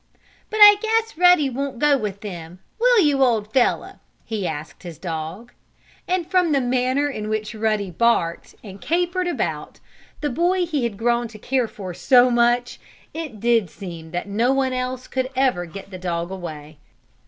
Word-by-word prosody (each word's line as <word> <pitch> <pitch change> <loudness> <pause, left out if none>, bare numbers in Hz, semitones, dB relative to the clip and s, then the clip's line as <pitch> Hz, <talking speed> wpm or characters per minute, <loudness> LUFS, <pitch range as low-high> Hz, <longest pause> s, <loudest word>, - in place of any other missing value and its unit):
"But 435 - -4
I 415 -1 +9
guess 450 0 0
Ruddy 355 -3 +5
won't 270 0 -4
go 295 +3 +4
with 210 -6 -4
them; 175 -4 -8 0.2
will - - +5
you, 290 -4 +2
old 220 -4 0
fellow?" 255 -2 +1 0.3
he 215 -5 -3
asked 155 0 -7
his 170 -4 -9
dog. 170 +6 -6 0.6
And 360 -1 0
from 360 -1 +2
the 280 - +3
manner 255 +3 +1
in 215 -7 -5
which 215 0 -3
Ruddy 215 -3 -1
barked 170 -4 0
and 200 -2 -11
capered 355 +2 0
about 350 - -3 0.4
the 295 - -1
boy 355 +6 +1
he 295 -7 -1
had 220 -4 -4
grown 235 +1 +1
to 220 -1 -12
care 250 +2 -1
for 190 -4 -8
so 250 +6 +4
much, 240 +1 +1 0.3
it 310 -9 -6
did 230 -4 +2
seem 170 -3 -9
that 175 +4 -4
no 225 +5 +1
one 270 -1 +1
else 255 0 -3
could 260 -1 -3
ever 250 -10 +1
get 195 +4 -10
the 185 - -8
dog 170 -1 -3
away. 155 -5 -8
240 Hz, 175 wpm, -22 LUFS, 195-285 Hz, 0.6 s, I